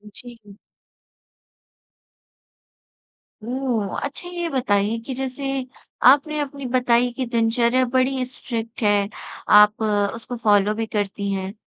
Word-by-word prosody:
जी। 225 Hz, -5 st, -11 dB, 2.9 s
ओह! 240 Hz, -5 st, -2 dB
अच्छा 300 Hz, +5 st, -6 dB
ये 345 Hz, -1 st, -3 dB
बताइए 220 Hz, -5 st, 0 dB
कि 265 Hz, -, -4 dB
जैसे 270 Hz, 0 st, -3 dB, 0.4 s
आपने 300 Hz, +2 st, +3 dB
अपनी 280 Hz, -1 st, -5 dB
बताई 245 Hz, -1 st, +3 dB
कि 255 Hz, +1 st, -3 dB
दिनचर्या 235 Hz, +1 st, +2 dB
बड़ी 260 Hz, +1 st, 0 dB
स्ट्रिक्ट 235 Hz, -1 st, -6 dB
है, 205 Hz, -1 st, +2 dB, 0.4 s
आप 210 Hz, +2 st, +6 dB, 0.3 s
उसको 240 Hz, +2 st, -7 dB
फॉलो 210 Hz, -2 st, +3 dB
भी 225 Hz, +1 st, -2 dB
करती 200 Hz, -1 st, -3 dB
हैं। 190 Hz, 0 st, -3 dB
240 Hz, 110 wpm, -22 LUFS, 210-265 Hz, 2.9 s, आप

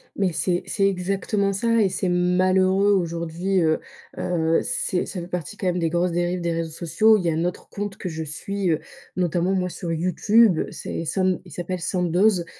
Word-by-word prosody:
Mais 195 Hz, -2 st, +1 dB
c'est 175 Hz, +2 st, 0 dB
c'est 195 Hz, -1 st, +2 dB
exactement 195 Hz, +2 st, 0 dB
ça, 230 Hz, +3 st, +2 dB
et 200 Hz, -, +3 dB
c'est 185 Hz, -, -2 dB
malheureux. 185 Hz, +2 st, +3 dB
Aujourd'hui, 170 Hz, +1 st, 0 dB
heu 155 Hz, -1 st, +2 dB, 0.4 s
heu, 165 Hz, -2 st, +1 dB
c'est 190 Hz, -6 st, -1 dB
ça 185 Hz, -, -5 dB
fait 170 Hz, -, -6 dB
partie 180 Hz, +2 st, -5 dB
quand 195 Hz, -, -5 dB
même 180 Hz, -1 st, +1 dB
des 165 Hz, -1 st, +1 dB
grosses 175 Hz, +2 st, +1 dB
dérives 175 Hz, +1 st, 0 dB
des 170 Hz, -1 st, -1 dB
réseaux 165 Hz, 0 st, -2 dB
sociaux. 200 Hz, +7 st, +3 dB
Il 195 Hz, -, -3 dB
y 170 Hz, -, +1 dB
a -, -, -1 dB
un 165 Hz, +2 st, 0 dB
autre 180 Hz, -, -4 dB
compte 205 Hz, -1 st, -5 dB
que 185 Hz, -, -4 dB
je 160 Hz, -1 st, -4 dB
suis, 185 Hz, +6 st, -3 dB
heu, 160 Hz, -, +2 dB, 0.4 s
notamment, 180 Hz, +1 st, +1 dB
moi, 180 Hz, -1 st, 0 dB
sur 170 Hz, 0 st, -5 dB
Youtube. 185 Hz, +4 st, +3 dB
C'est -, -, -5 dB
Sand 185 Hz, +2 st, 0 dB
il 175 Hz, -, -14 dB
s'appelle 175 Hz, +4 st, -4 dB
Sandoz. 180 Hz, +1 st, +2 dB
180 Hz, 200 wpm, -23 LUFS, 170-195 Hz, 0.4 s, et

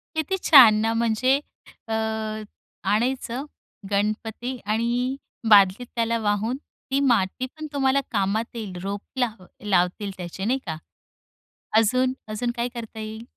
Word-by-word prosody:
किती 315 Hz, +5 st, 0 dB
छान 250 Hz, -8 st, +9 dB
ना. 225 Hz, +1 st, +1 dB
म्हणजे 235 Hz, +4 st, +2 dB, 0.5 s
अ, 225 Hz, -, -2 dB, 1.0 s
आणायचं 250 Hz, +3 st, 0 dB, 0.5 s
गणपती 220 Hz, +5 st, -1 dB
आणि 235 Hz, +4 st, 0 dB, 0.3 s
बादलीत 200 Hz, +3 st, +6 dB
त्याला 230 Hz, 0 st, +1 dB
वाहून 215 Hz, +3 st, 0 dB, 0.3 s
ती 275 Hz, -, +2 dB
मातीपण 255 Hz, +4 st, 0 dB
तुम्हाला 275 Hz, 0 st, +2 dB
कामात 215 Hz, +3 st, -1 dB
येईल. 215 Hz, -5 st, -5 dB
रोप 200 Hz, +1 st, -3 dB, 0.2 s
लाव 220 Hz, -7 st, -1 dB, 0.2 s
लावतील 195 Hz, +1 st, +1 dB
त्याचे 180 Hz, +2 st, -5 dB
नाही 255 Hz, +4 st, +1 dB
का? 160 Hz, -4 st, -3 dB, 1.0 s
अजून 255 Hz, +4 st, +3 dB
अजून 225 Hz, +3 st, -2 dB
काय 235 Hz, +1 st, 0 dB
करता 225 Hz, -1 st, -7 dB
येईल? 220 Hz, +1 st, -6 dB
225 Hz, 120 wpm, -24 LUFS, 205-255 Hz, 1.0 s, छान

